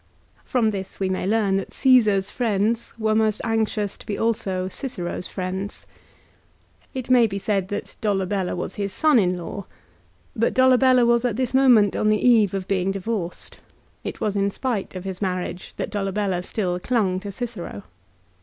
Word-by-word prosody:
1 - - -31
From 230 -4 +1
this 195 -2 -6
we 190 -1 0
may 185 0 -1
learn 205 -2 +2
that 195 - -4
Caesar's 215 -7 +3
friends 225 -1 0
were 220 -1 +1
most 215 -1 +2
anxious 220 -2 -1
to - - -13
be 205 - -2
also 195 -5 -1
Cicero's 190 -6 -4
friends. 190 +2 -5 1.1
It 255 -1 -3
may 245 -2 +6
be 195 -1 -4
said 195 -1 -1
that 205 +1 -5
Dolabella 195 -2 0
was - - -4
his 200 -1 -2
son 305 -1 +4
in 180 -2 +1
law; 180 +3 -7 0.7
but 230 - +1
Dolabella 255 -1 +5
was 235 0 +3
at 245 -4 0
this 255 0 -1
moment 245 -7 +5
on 215 - +2
the 215 - +4
eve 215 -5 +5
of 190 -1 -4
being 190 -1 0
divorced. 195 -2 -4 0.4
It - - -5
was 210 -1 -1
in 200 0 +2
spite 215 -3 -3
of 185 - -5
his 190 -1 -6
marriage 180 -2 -3
that - - -3
Dolabella 195 -2 -1
still 180 -2 -2
clung 195 -4 0
to 200 +1 -6
Cicero. 200 - -6
205 Hz, 175 wpm, -23 LUFS, 190-230 Hz, 1.1 s, may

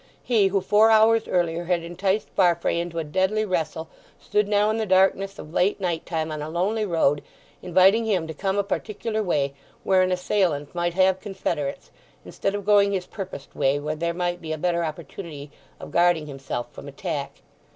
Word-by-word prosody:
He 220 -5 +3
who, 195 0 0
four 210 +4 +4
hours 225 0 +4
earlier, 175 -1 0
had 175 -1 0
enticed 190 +4 -1
Farfrae 170 -2 +2
into 170 -1 -4
a 165 - 0
deadly 190 +7 0
wrestle 160 -4 -2 0.3
stood 210 -1 0
now 210 +1 +2
in 220 - -1
the 220 -1 -2
darkness 195 +1 +2
of 155 - -10
late 190 +4 +2
night 175 -4 -2
time 160 -2 -2
on 155 -1 -4
a 150 - -5
lonely 205 +6 0
road, 145 -5 +2 0.4
inviting 190 +5 +4
him 190 -7 0
to 160 - -6
come 195 +5 -2
a 200 - +2
particular 215 +2 -3
way, 145 -8 0 0.3
where 190 -1 +4
an 185 0 +2
assailant 180 -5 0
might 175 -1 -1
have 190 0 +3
confederates, 175 -8 -4 0.3
instead 195 0 -2
of 205 -2 -5
going 200 -1 +4
his 185 -2 -2
purposed 185 -9 -8
way, 135 +2 +1
where 150 +1 -3
there 170 +2 -1
might 175 0 -2
be 160 -1 -6
a 155 - -2
better 170 +1 0
opportunity 155 -2 -7 0.3
of - - -9
guarding 170 -2 +3
himself 135 -4 -5
from - - -10
attack. - - -5
180 Hz, 190 wpm, -24 LUFS, 160-200 Hz, 0.4 s, four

